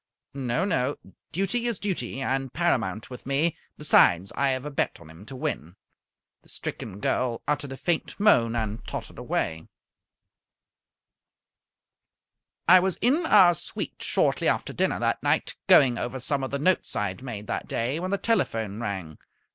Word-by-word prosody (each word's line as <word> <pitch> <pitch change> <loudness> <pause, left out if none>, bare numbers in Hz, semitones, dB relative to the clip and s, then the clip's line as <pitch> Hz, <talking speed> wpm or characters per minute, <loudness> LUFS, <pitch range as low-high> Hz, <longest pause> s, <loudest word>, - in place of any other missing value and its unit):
"No, 135 +5 -1
no. 145 -7 0 0.3
Duty 195 +7 0
is 235 -4 -1
duty, 135 - -3
and 135 -1 -1
paramount 120 - -1
with 125 - -9
me. 145 +4 +1 0.2
Besides, 95 - +4
I 140 0 +2
have 130 +1 -1
a 150 - -4
bet 140 - -1
on 80 -2 -14
him 85 +6 -14
to 135 - -8
win." 85 - -4 0.7
The - - -23
stricken 100 -2 -6
girl 120 +2 -1
uttered 145 -2 -1
a 135 - -6
faint 170 +5 -2
moan, 120 - +4
and 110 -1 -3
tottered - - -6
away. 80 0 -2 3.0
I 185 +1 +9
was 185 0 0
in 290 - +2
our 185 -4 +7
suite - - -4
shortly - - +1
after - - 0
dinner - - 0
that - - 0
night, - - +1
going 125 -3 +6
over 125 +2 -3
some 135 +2 -1
of 130 - -2
the 140 - -2
notes 185 +6 +1
I 105 -1 0
had 95 - -9
made 115 -6 -6
that - - -4
day, 125 +7 -1
when 185 +2 -3
the 200 - +1
telephone 115 - 0
rang. 95 -8 -5
135 Hz, 165 wpm, -26 LUFS, 110-175 Hz, 3.0 s, I